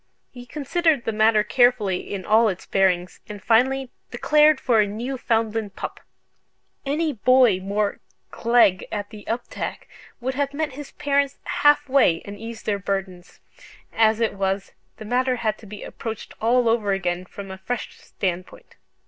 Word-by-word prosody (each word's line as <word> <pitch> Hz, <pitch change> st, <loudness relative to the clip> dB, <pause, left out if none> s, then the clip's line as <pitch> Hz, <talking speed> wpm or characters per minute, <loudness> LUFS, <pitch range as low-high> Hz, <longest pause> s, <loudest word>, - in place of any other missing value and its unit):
He 245 Hz, -1 st, -11 dB
considered 300 Hz, +1 st, 0 dB
the -, -, 0 dB
matter 215 Hz, 0 st, +3 dB
carefully 230 Hz, -5 st, +2 dB
in 195 Hz, -2 st, -4 dB
all 220 Hz, +1 st, +4 dB
its 185 Hz, -2 st, -5 dB
bearings, 180 Hz, -2 st, +1 dB
and 210 Hz, -1 st, -7 dB
finally 255 Hz, +5 st, +2 dB, 0.2 s
declared 300 Hz, +4 st, +4 dB
for 240 Hz, -5 st, +2 dB
a 205 Hz, -, +1 dB
Newfoundland 225 Hz, -2 st, -2 dB
pup. -, -, -6 dB, 0.9 s
Any 305 Hz, +2 st, 0 dB
boy 245 Hz, -3 st, +4 dB
more 200 Hz, +2 st, -1 dB, 0.3 s
"gleg 230 Hz, -5 st, +3 dB
at 205 Hz, 0 st, -4 dB
the 210 Hz, -2 st, -10 dB
uptak" 235 Hz, +2 st, -4 dB, 0.3 s
would 260 Hz, +2 st, -2 dB
have 285 Hz, +1 st, -2 dB
met 310 Hz, -1 st, -1 dB
his 285 Hz, +2 st, -10 dB
parents 280 Hz, -1 st, 0 dB
half 290 Hz, 0 st, +3 dB
way, 255 Hz, -11 st, +3 dB
and 200 Hz, -, -7 dB
eased 225 Hz, +2 st, -9 dB
their 205 Hz, -1 st, 0 dB
burden. 195 Hz, -2 st, -3 dB, 0.7 s
As 220 Hz, 0 st, +3 dB
it 225 Hz, -1 st, +1 dB
was, 195 Hz, 0 st, -2 dB, 0.3 s
the 215 Hz, -, -9 dB
matter 250 Hz, +3 st, +1 dB
had 215 Hz, -3 st, -2 dB
to 220 Hz, -, -13 dB
be 210 Hz, +1 st, -9 dB
approached 225 Hz, -2 st, -7 dB
all 240 Hz, +2 st, +3 dB
over 220 Hz, -3 st, +2 dB
again 180 Hz, -2 st, -2 dB
from 195 Hz, +1 st, -9 dB
a 190 Hz, -, -8 dB
fresh 245 Hz, +5 st, -5 dB
standpoint. 185 Hz, -, -5 dB
225 Hz, 155 wpm, -23 LUFS, 200-255 Hz, 0.9 s, all